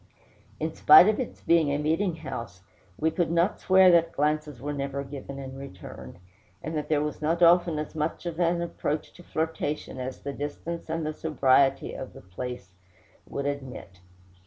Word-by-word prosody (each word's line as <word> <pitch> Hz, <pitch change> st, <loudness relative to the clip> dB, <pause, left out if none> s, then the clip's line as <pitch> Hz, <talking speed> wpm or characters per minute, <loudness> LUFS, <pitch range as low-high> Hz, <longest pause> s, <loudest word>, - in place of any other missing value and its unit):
In 160 Hz, 0 st, -2 dB
spite 155 Hz, +5 st, +8 dB
of 215 Hz, -, +2 dB
its 255 Hz, -, -5 dB
being 165 Hz, -3 st, +3 dB
a 140 Hz, -, +1 dB
meeting 160 Hz, +5 st, 0 dB
house, 115 Hz, -, -7 dB, 0.3 s
we 160 Hz, +1 st, +1 dB
could 175 Hz, 0 st, 0 dB
not 170 Hz, +4 st, +1 dB
swear 185 Hz, -1 st, +6 dB
that 170 Hz, -1 st, +3 dB
glances 150 Hz, -2 st, -1 dB
were 145 Hz, +4 st, -4 dB
never 140 Hz, 0 st, -3 dB
given 140 Hz, 0 st, -8 dB
and 135 Hz, -1 st, -7 dB
returned, 135 Hz, -14 st, -10 dB, 0.5 s
and 155 Hz, +3 st, -4 dB
that 150 Hz, -, -3 dB
there 150 Hz, -1 st, +2 dB
was 150 Hz, 0 st, -4 dB
not 165 Hz, +3 st, +1 dB
often 170 Hz, -1 st, +5 dB
as 150 Hz, 0 st, -4 dB
much 155 Hz, +2 st, -3 dB
of 170 Hz, -1 st, -4 dB
an 170 Hz, 0 st, +2 dB
approach 155 Hz, -3 st, -3 dB
to -, -, -14 dB
flirtation 160 Hz, -4 st, -3 dB
as 130 Hz, +1 st, -5 dB
the 140 Hz, -, -5 dB
distance 155 Hz, +4 st, -5 dB
and 160 Hz, 0 st, -2 dB
the 155 Hz, -, -2 dB
sobriety 135 Hz, -3 st, +2 dB
of 130 Hz, -, -7 dB
the -, -, -12 dB
place 95 Hz, +2 st, -7 dB, 0.6 s
would 140 Hz, -, -4 dB
admit. 130 Hz, -10 st, -5 dB
150 Hz, 180 wpm, -27 LUFS, 140-165 Hz, 0.6 s, spite